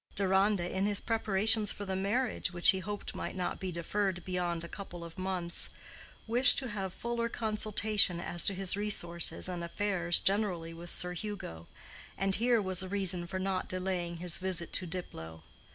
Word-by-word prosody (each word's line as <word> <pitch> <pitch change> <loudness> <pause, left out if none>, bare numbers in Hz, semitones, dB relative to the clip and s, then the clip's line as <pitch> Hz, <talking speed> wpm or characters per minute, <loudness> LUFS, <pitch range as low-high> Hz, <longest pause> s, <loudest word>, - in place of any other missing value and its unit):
Deronda, 195 -1 +2
in 190 +2 -1
his 205 -1 +2
preparations 215 -1 +3
for 205 - -6
the 190 -1 -3
marriage, 205 +2 -1
which 175 -1 +3
he 190 - +3
hoped 205 +2 -5
might - - -5
not 180 -1 -3
be 190 -1 -4
deferred 180 +1 -2
beyond 175 -2 -2
a - - -6
couple 175 -2 -9
of 170 -1 -10
months, 185 -2 0 0.6
wished 245 +4 +7
to 260 -3 +2
have 195 -3 -4
fuller 235 +3 -3
consultation 215 -4 +1
as 175 0 +3
to 195 - +2
his 190 0 0
resources 175 -6 0
and 175 -2 -4
affairs 175 -1 0
generally 190 -5 -1
with 170 +1 -9
Sir 180 +1 +1
Hugo, 180 - -7 0.5
and 195 +1 0
here 235 +3 +3
was 185 -2 +4
a 185 - -5
reason 185 -3 -1
for 185 +2 -4
not 185 0 -2
delaying 180 -2 -2
his 175 0 +1
visit 185 -3 -2
to 185 - +1
Diplow. 80 - -7
190 Hz, 175 wpm, -31 LUFS, 175-205 Hz, 0.6 s, wished